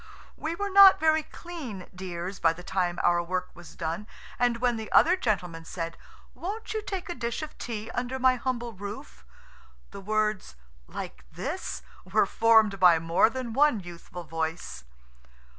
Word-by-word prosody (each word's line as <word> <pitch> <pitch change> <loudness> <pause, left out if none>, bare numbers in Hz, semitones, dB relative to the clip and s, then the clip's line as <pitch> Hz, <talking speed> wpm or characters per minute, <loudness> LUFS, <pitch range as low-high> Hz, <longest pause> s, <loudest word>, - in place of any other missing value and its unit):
We 320 +2 -3
were 405 +2 -3
not 395 0 +9
very 315 0 +3
clean 295 - -8
dears 180 0 -5
by 165 -1 +4
the 180 +2 -11
time 175 -2 -1
our 175 0 +4
work 180 +1 -3
was 175 -1 -13
done, 170 +5 -4 0.3
and 245 -1 +2
when 245 0 +1
the 220 -1 -6
other 350 +3 +6
gentleman 180 - -2
said, 165 0 -5 0.4
"Won't 430 +5 -5
you 435 - -1
take 385 -3 -5
a 350 - -3
dish 235 -1 -3
of 305 - -8
tea 225 -1 -5
under 250 +2 -2
my 260 0 +4
humble 240 -2 -3
roof?" 205 +8 -8 0.7
the 200 - -9
words 215 - -1 0.3
"Like - - -7
this?" 60 - -4 0.2
were 200 +3 +2
formed 220 -2 +4
by 180 -3 +7
more 165 +6 +3
than 250 -2 -5
one 290 -3 +4
youthful 175 0 -9
voice. 160 - -4
215 Hz, 160 wpm, -27 LUFS, 175-260 Hz, 0.7 s, not